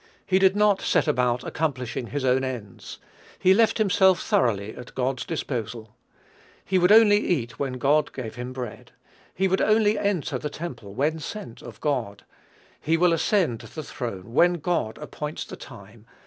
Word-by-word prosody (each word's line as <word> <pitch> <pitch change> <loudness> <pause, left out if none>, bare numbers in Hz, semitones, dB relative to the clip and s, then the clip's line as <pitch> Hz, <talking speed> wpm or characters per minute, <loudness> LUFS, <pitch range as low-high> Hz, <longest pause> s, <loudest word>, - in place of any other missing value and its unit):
He 190 0 +2
did 190 0 +4
not 205 -2 +3
set - - +1
about 125 -3 +1
accomplishing 130 -6 -3
his 140 +1 -3
own 130 +1 +2
ends. 120 -7 -6 0.4
He 185 - +5
left 225 +2 +3
himself 190 -4 +4
thoroughly 110 -3 0
at 125 - -11
God's 130 -1 -1
disposal. 115 -8 -5 0.7
He 190 0 +2
would 180 +2 +4
only 215 -1 +7
eat 120 - -2
when 135 -2 -2
God 145 +4 +2
gave 120 -5 -6
him 125 +1 -6
bread; 125 -1 -8 0.4
he 190 +1 +2
would 190 +1 +1
only 215 0 +3
enter 200 -6 -1
the 150 - -4
temple 125 -11 -8
when 155 +5 0
sent 195 - -8
of 120 - -11
God; 120 -9 -2 0.5
he 165 +2 +1
will 175 0 +4
ascend 165 - +1
the 125 +6 -8
throne 115 -6 -6
when 175 +6 +5
God 170 -9 -2
appoints 150 0 -6
the - - -9
time. 110 -2 -13
140 Hz, 165 wpm, -25 LUFS, 120-180 Hz, 0.7 s, only